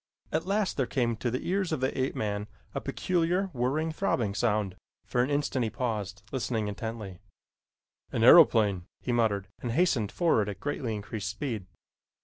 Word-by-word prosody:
At 160 +3 -1
last 200 0 0
there 130 -4 +1
came 120 -4 0
to 120 - -1
the 125 +3 -3
ears 185 0 0
of 155 - 0
the 130 +1 0
ape 130 +1 -1
man 105 -1 -2 0.3
a - - -2
peculiar 180 +2 0
whirring, 140 +6 0
throbbing 120 - 0
sound. 105 -4 0 0.3
For 120 - +1
an 125 - +1
instant 145 -2 0
he 110 - 0
paused, 105 -4 -3
listening 115 -5 -1
intently, 105 -3 -5 0.9
"An 115 - 0
aeroplane!" 110 - +7
he 125 - -2
muttered, 110 -5 +1
and 120 -2 -2
hastened 130 - +2
forward 115 - +2
at 100 -2 -6
greatly 125 -4 -2
increased 105 0 -4
speed. 115 -10 -4
120 Hz, 165 wpm, -29 LUFS, 105-145 Hz, 0.9 s, aeroplane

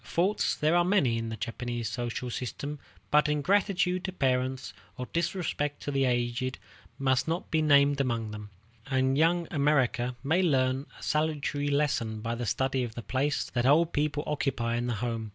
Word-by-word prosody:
Faults 190 +5 +1
there 155 +3 +2
are 175 - +5
many 160 - +2
in 115 0 -4
the 110 - -5
Japanese 120 0 -4
social 120 +1 -3
system, 140 +5 -5 0.3
but 150 0 +4
ingratitude 180 +3 +1
to 190 - -3
parents, 130 - -1 0.2
or 125 - -4
disrespect 165 -4 -1
to 145 - -3
the 135 -1 +2
aged, 120 +1 -1 0.4
must 130 0 +1
not 165 +2 -3
be 160 - +2
named 140 -2 +4
among 115 -4 -1
them; 105 -1 -8 0.4
and 130 0 +2
Young 165 +3 +2
America 135 -5 +1
may 160 +6 +2
learn 135 -4 +1
a - - -12
salutary 150 -2 0
lesson 125 -7 0
by 115 +2 -3
the 120 0 -4
study 130 +3 0
of 120 -2 -6
the 120 - -6
place 135 +2 -1
that 120 0 +1
old 160 +4 +4
people 145 0 0
occupy 125 -6 -1
in 120 +1 -1
the 120 - -1
home. 115 0 -3
135 Hz, 175 wpm, -29 LUFS, 120-150 Hz, 0.4 s, are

